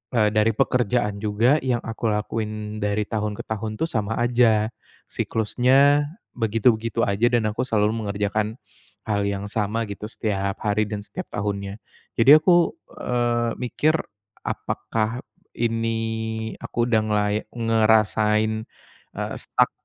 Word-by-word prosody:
eee, 105 -2 +4
dari 110 +1 +3
pekerjaan 115 -3 +1
juga 110 +7 +3
yang 125 -3 0
aku 115 0 -3
lakuin 105 0 -3
dari 105 +1 +1
tahun 105 -2 -2
ke - - -4
tahun 110 0 -3
tuh 165 - +1
sama 110 -1 -1
aja 120 -3 +3 0.4
siklusnya 135 +6 +3 0.3
begitu-begitu 115 0 +1
aja 100 +4 +2
dan 110 -3 +2
aku 120 +4 -2
selalu 110 0 +1
mengerjakan 105 +1 -1 0.5
hal 100 -1 +1
yang 100 0 -3
sama 110 +1 -1
gitu 100 +1 -6
setiap 100 -3 -2
hari 105 0 +1
dan 105 -1 -4
setiap 185 - -7
tahunnya. 100 -1 -3 0.4
Jadi 125 +5 +7
aku, 175 +1 +4 0.3
eee, 120 -1 0
mikir 150 +6 +1 0.5
apakah 115 +2 -2 0.4
ini 115 -1 0 0.7
aku 120 0 -1
udah 110 -2 +4
ngelai 105 -1 +1
ngerasain, 110 -1 +2 0.5
eee, - - -3
stuck - - +1
110 Hz, 125 wpm, -23 LUFS, 105-120 Hz, 0.7 s, Jadi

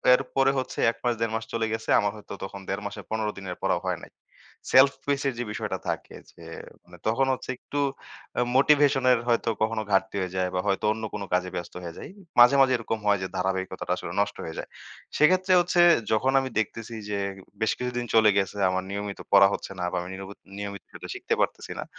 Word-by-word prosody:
এরপরে 135 +1 +1
হচ্ছে 130 - -5
১ - - -17
মাস 120 - +2
১.৫ 115 -1 0
মাস 110 - -2
চলে 115 -1 0
গেছে। 110 - -5
আমার 105 - +1
হয়তো 105 -1 -10
তখন 100 +1 -6
১.৫ 100 +1 -2
মাসে 100 - -5
১৫ 110 -1 -1
দিনের 90 -2 -6
পড়াও - - +1
হয় - - -1
নাই। - - -13 0.6
self 130 +2 +8
pace 140 -1 0
এর 135 - 0
যে - - 0
বিষয়টা - - -3
থাকে - - -4 0.2
যে - - -16 0.4
মানে 90 0 -15
তখন 115 +5 +2
হচ্ছে 130 - -7
একটু 145 - -5 0.6
অ্যা 125 - +2
মোটিভেশন 140 -1 +4
এর 120 - +4
হয়তো 115 -1 +2
কখনো 110 0 +1
ঘাটতি 95 0 +2
হয়ে 90 0 -4
যায় 95 0 0
বা - - +1
হয়তো 100 +1 0
অন্য 110 - -7
কোনো 100 -1 -4
কাজে 90 0 +1
ব্যস্ত 85 - -5
হয়ে 85 -1 -7
যাই। - - -8 0.3
মাঝে, 125 +3 +8
মাঝে 130 -1 +5
এরকম 115 -1 -3
হয় 100 -2 +4
যে - - -2
ধারাবাহিকতাটা 95 -1 -2
আসলে - - -6
নষ্ট 105 - -1
হয়ে 80 - -6
যায়। - - -7 0.5
সেক্ষেত্রে 185 +4 +4
হচ্ছে 175 0 +2 0.3
যখন 120 +5 +2
আমি 135 0 -3
দেখতেছি 115 +2 -4
যে 105 - -1 0.4
বেশ 110 - +2
কিছুদিন 125 -1 -3
চলে 110 -1 +7
গেছে 100 +1 0
আমার 95 0 -1
নিয়মিত 100 0 -4
পড়া 100 -1 +8
হচ্ছে - - -5
না 90 - -1
বা - - -3
আমি 90 - -7
নিরবত 95 +1 -9 0.2
নিয়মিত 100 -2 -6
এটা - - -9
শিখতে - - -2
পারতেছি - - -2
না, - - -2
110 Hz, 215 wpm, -26 LUFS, 95-125 Hz, 0.6 s, self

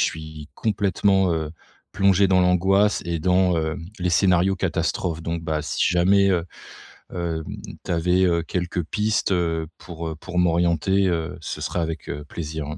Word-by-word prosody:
suis 80 -1 -3
complètement, 100 -3 +1
heu, 80 -1 -3 0.4
plongé 100 -1 +3
dans 95 -1 +4
l'angoisse 95 +3 +3
et 85 -1 -1
dans, 90 0 +3
heu, 80 0 -2 0.2
les 90 0 0
scénarios 90 +1 +3
catastrophes 85 -2 -1
donc 85 0 -3
bah, 80 -1 -2
si - - -1
jamais, 95 +3 +4
heu, 85 -3 +1 0.7
hem, 85 -2 -3 0.4
tu - - -7
avais, 90 +2 +2
heu, 85 -2 +2
quelques 90 0 -2
pistes, 105 +4 0
heu, 80 -3 0
pour, 85 -1 -7
heu, 80 - -6
pour 90 +3 -5
m'orienter 90 +2 +2
heu, 85 0 -2
ce - - -5
sera 90 - -2
avec, 80 -1 -4
heu, 75 +1 -5
plaisir. 80 0 -5
85 Hz, 160 wpm, -23 LUFS, 80-95 Hz, 0.7 s, dans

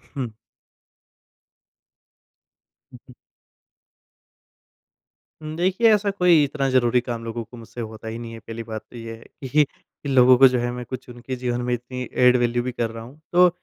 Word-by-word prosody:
हुँ। 130 -4 -3 2.6
हुँ, 125 - -12
हुँ। 125 - -15 2.3
हुँ, 155 0 -6
देखिए 190 +6 +4
ऐसा 205 -1 +1
कोई 180 -5 +4
इतना 140 -1 -1
ज़रूरी 125 -1 +3
काम 120 -2 -5
लोगों 115 0 -4
को 120 - -14
मुझसे 115 +1 -9
होता 110 0 -8
ही 115 +1 -4
नहीं 115 -1 -7
है 115 - -8
पहली 115 +1 -7
बात 110 -1 -6
तो - - -13
ये 115 -1 -7
है 115 - -16 0.3
कि 150 +3 +5
कि 140 0 -12
लोगों 130 -1 +6
को 135 - +9
जो 125 -1 +1
है 120 0 -1
मैं 125 0 -6
कुछ 130 -1 -7
उनके 120 +2 -6
जीवन 125 -1 -2
में 125 0 -1
इतनी 125 +1 -5 0.2
एड 125 0 +6
वैल्यू 120 0 +1
भी 125 - -3
कर 120 -2 -2
रहा 115 0 -8
हूँ। 130 +6 -14
तो 180 +1 +7
125 Hz, 180 wpm, -23 LUFS, 115-135 Hz, 2.6 s, को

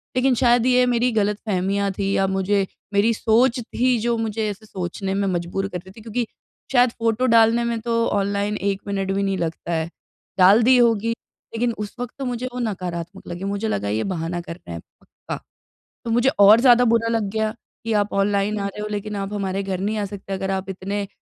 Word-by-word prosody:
लेकिन 255 0 +3
शायद 240 -1 +3
ये 250 0 +4
मेरी 245 0 +2
ग़लतफ़हमियाँ 200 -2 0
थी 195 +1 -2
या 195 - +2
मुझे 195 +1 +1 0.3
मेरी 205 +3 +3
सोच 230 +3 +2
थी 245 +1 0
जो 235 +1 0
मुझे 220 -1 -2
ऐसे 205 +2 -8
सोचने 190 0 -4
में 200 0 0
मजबूर 180 +2 -2
कर 185 - -5
रही 185 +2 -12
थी 220 - -14
क्योंकि 230 +2 -2 0.5
शायद 250 -1 +5
फ़ोटो 230 +2 +1
डालने 230 0 +5
में 235 -1 -1
तो 230 0 +1
ऑनलाइन 200 +1 0
एक 200 -1 -1
मिनट 195 -1 -1
भी 195 +1 0
नहीं 195 -1 0
लगता 170 0 -4
है, 160 0 -1 0.5
डाल 195 +4 +7
दी 255 +2 +6
होगी, 230 -2 +3 0.4
लेकिन 235 +1 0
उस 210 -1 -6
वक्त 245 -1 -5
तो 270 - -3
मुझे 245 0 -3
वो 250 - -4
नकारात्मक 180 -5 -4
लगी 175 +2 -6
मुझे 200 +2 -2
लगा 100 - -1
ये 110 +2 0
बहाना 175 -2 -3
कर 170 -1 -8
रहे 125 - -13
हैं 85 - -6 0.2
पक्का। - - -8 0.7
तो 230 - -2
मुझे 240 +3 +3
और 205 +3 +8
ज़्यादा 245 -1 +6
बुरा 230 0 +2
लग 225 -1 +1
गया 220 0 0 0.3
कि 225 0 -1
आप 205 -1 +1
ऑनलाइन 200 +1 +1
आ 200 - -1
रहे 200 +1 -7
हो 210 - -3
लेकिन 210 0 -4
आप 200 0 -4
हमारे 195 -1 -2
घर 190 -2 -3
नहीं 210 +3 -1
आ 205 - -1
सकते 195 0 -7
अगर 190 0 -2
आप 190 0 -3
इतने 200 +2 -3
205 Hz, 210 wpm, -22 LUFS, 195-230 Hz, 0.7 s, और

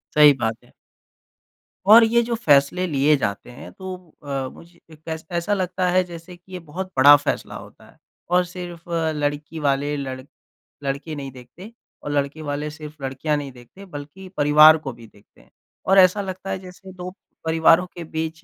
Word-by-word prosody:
सही 150 -1 +8
बात 115 +1 -2
है। - - -23 1.2
और 225 +2 +10
ये 235 +1 +3
जो 235 0 -2
फैसले 155 -2 +3
लिए 150 0 +3
जाते 100 -2 -3
हैं, 120 - -11
तो 190 -1 -7 0.3
अ, 135 -2 -3
मुझे 170 0 -17
एक 155 -1 -16
ऐस 160 0 -5
ऐसा 170 +4 -1
लगता 185 -1 -1
है 185 +1 +3
जैसे 175 0 -11
कि 180 +2 -23
ये 180 - -5
बहुत 185 +5 -6
बड़ा 145 +2 +9
फैसला 145 +1 -3
होता - - -12
है - - -22 0.3
और 180 0 +4
सिर्फ़ 175 -1 -9 0.3
लड़की 145 +2 -3
वाले 145 0 0
लड़ 130 -2 -5 0.6
लड़के 140 +3 -4
नहीं 135 -2 -6
देखते 130 - -13 0.3
और 145 - -4
लड़के 145 +2 -2
वाले 150 0 -3
सिर्फ़ 150 -1 -11
लड़कियाँ 135 +3 -1
नहीं 140 -2 -6
देखते 125 +11 -15
बल्कि 155 +3 -10
परिवार 150 +2 +7
को 135 - -4
भी 115 -1 -14
देखते 100 -1 -24
हैं - - -25 0.4
और 195 +1 +3
ऐसा 185 +2 +5
लगता 190 0 -6
है 190 0 -2
जैसे 185 +1 -12
2 180 0 -7 0.3
परिवारों 165 +2 +4
के 175 - -6
बीच 160 0 -5
155 Hz, 180 wpm, -22 LUFS, 140-180 Hz, 1.2 s, और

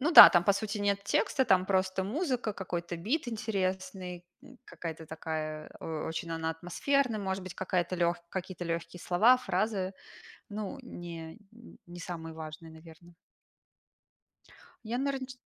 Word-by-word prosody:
Ну 300 +5 +2
да, - - +14
там 175 - +5
по 200 - +5
сути 210 +1 -2
нет 200 -1 +1
текста, 265 +5 +2
там 185 -5 +4
просто 190 -1 +1
музыка, 250 - -1
какой-то 175 -3 -4
бит 240 - -1
интересный, 190 -4 -3 0.2
н 260 -2 -15
какая-то 160 -1 -7
такая, 155 -1 -4
э, - - -6 0.2
очень 165 +1 -4
она 165 0 -1
атмосферная, 215 - 0
может 190 -1 -2
быть 185 - -7
какая-то 185 -1 0
лёгк 170 0 +1
какие-то 185 -1 -5
легкие 170 +1 -3
слова, 215 +10 +5
фразы, 200 -5 -1 0.6
ну, 210 +4 -5
не 170 -7 -8 0.5
не 175 0 -9
самые 165 -2 -6
важные, 160 +1 -8
наверно. 165 +2 -14 1.8
Я, 240 - 0
наверно, 275 -1 -1
ч - - -6
185 Hz, 145 wpm, -31 LUFS, 170-215 Hz, 1.8 s, да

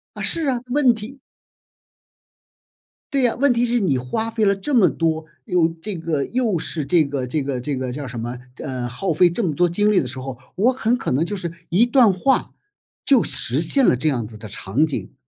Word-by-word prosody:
啊， - - -6
是 330 -2 +2
啊， 250 -3 0
问 260 -1 +3
题 230 +5 -9 1.9
对 275 - +2
呀， 240 -2 +2
问 275 0 +3
题 235 0 +1
是 240 0 +1
你 170 -10 +1
花 220 - -3
费 220 -1 -1
了 200 -1 +3
这 195 +9 -4
么 220 -7 +5
多， 160 -1 -1 0.2
又 175 -2 +2
这 170 +5 -7
个 160 -4 -2
又 235 -7 0
是 155 -1 -1
这 155 +2 +3
个 140 -2 -3
这 140 +3 -1
个 130 -3 -3
这 140 0 -3
个 130 -1 -3
叫 140 +1 -5
什 120 -1 -6
么， 120 +2 -5 0.2
呃， 125 -3 -5
耗 165 +9 -2
费 175 +3 +5
这 190 +7 -2
么 165 - 0
多 175 +4 +2
精 205 +4 +2
力 195 - +4
的 130 - -2
时 130 +1 -6
候， 130 -1 -7 0.2
我 240 +7 +3
很 245 -1 0
可 - - -3
能 140 +6 +1
就 205 +3 -3
是 170 -2 -5 0.2
一 205 +8 +4
段 240 -4 +5
话 260 +9 0 0.5
就 270 -4 +4
实 135 +6 +2
现 255 - +3
了 - - +4
这 155 +5 0
样 120 -6 -2
子 110 - -12
的 110 0 -9
场 110 +9 0
景， 145 - -5
170 Hz, 240 characters per minute, -21 LUFS, 135-225 Hz, 1.9 s, 么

